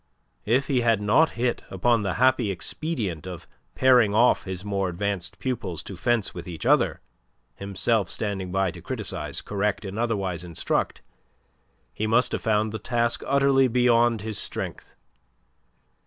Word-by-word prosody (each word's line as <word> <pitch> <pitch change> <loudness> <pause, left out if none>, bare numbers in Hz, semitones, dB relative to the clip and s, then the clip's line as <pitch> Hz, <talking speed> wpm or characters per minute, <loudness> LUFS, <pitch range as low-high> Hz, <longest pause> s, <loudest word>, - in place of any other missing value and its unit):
If 125 +5 +3
he 130 -4 +1
had 115 -3 +3
not 110 +11 +4
hit 120 0 0
upon 115 +5 +2
the 100 -3 -2
happy 130 -3 +3
expedient 100 - -4
of 90 -3 -8 0.3
pairing 125 -5 +4
off 120 +3 +4
his 95 0 -6
more 100 -2 -1
advanced 95 0 -3
pupils 115 - -3
to 100 - -8
fence 115 +2 0
with 85 0 -8
each 85 -3 -7
other, - - +3 0.5
himself 100 - -1
standing 95 -4 -3
by 95 -1 +1
to 85 +1 -11
criticize, - - -3
correct 105 0 -1
and 100 +3 -5
otherwise 100 -7 -1
instruct, 85 -3 -2 0.9
he 110 - -2
must 115 +3 +3
have - - -2
found 110 -1 +1
the 110 - -5
task 120 -1 0
utterly 135 -1 +4
beyond 120 -2 +3
his 110 -1 -2
strength. - - -4
105 Hz, 150 wpm, -25 LUFS, 95-120 Hz, 0.9 s, not